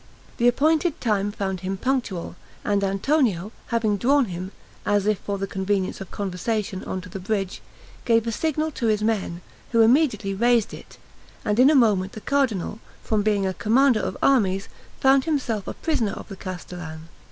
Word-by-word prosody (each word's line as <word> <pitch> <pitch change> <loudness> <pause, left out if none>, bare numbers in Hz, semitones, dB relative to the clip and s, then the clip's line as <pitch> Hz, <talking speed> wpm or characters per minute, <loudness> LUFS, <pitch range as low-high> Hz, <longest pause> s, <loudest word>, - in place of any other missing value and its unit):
The 240 - +3
appointed 310 +6 +2
time 205 -3 0
found 190 -3 -3
him 190 +2 -3
punctual; 230 -9 -2 0.3
and 200 -1 +1
Antonio, 200 - +1 0.2
having 225 -3 +1
drawn 275 +5 +3
him, 185 -1 -6 0.3
as 205 -1 +1
if 210 -2 +1
for 200 -1 -3
the 195 - -2
convenience 195 0 -2
of 195 - -7
conversation, 200 +1 -3
on 185 - -3
to 185 - -11
the 195 - -6
bridge, 195 0 -2 0.4
gave 230 -1 +3
a 230 - -1
signal 315 +5 -1
to 240 -5 -2
his 210 -1 +1
men, 200 -6 -1 0.3
who 230 - +5
immediately 225 -5 +3
raised 235 +1 +2
it, - - -11 0.5
and 210 +2 +1
in 260 +3 +7
a 310 - +4
moment 205 -7 +3
the 215 - -8
cardinal, 230 -8 0 0.2
from 215 -2 +1
being 205 -2 +1
a 190 - 0
commander 240 +4 +3
of - - -3
armies, 195 -8 +2 0.3
found 270 0 +4
himself 250 -10 -1
a - - -4
prisoner 245 -11 -1
of - - -9
the 195 - -7
castellan. 175 -4 -7
210 Hz, 175 wpm, -24 LUFS, 190-245 Hz, 0.5 s, in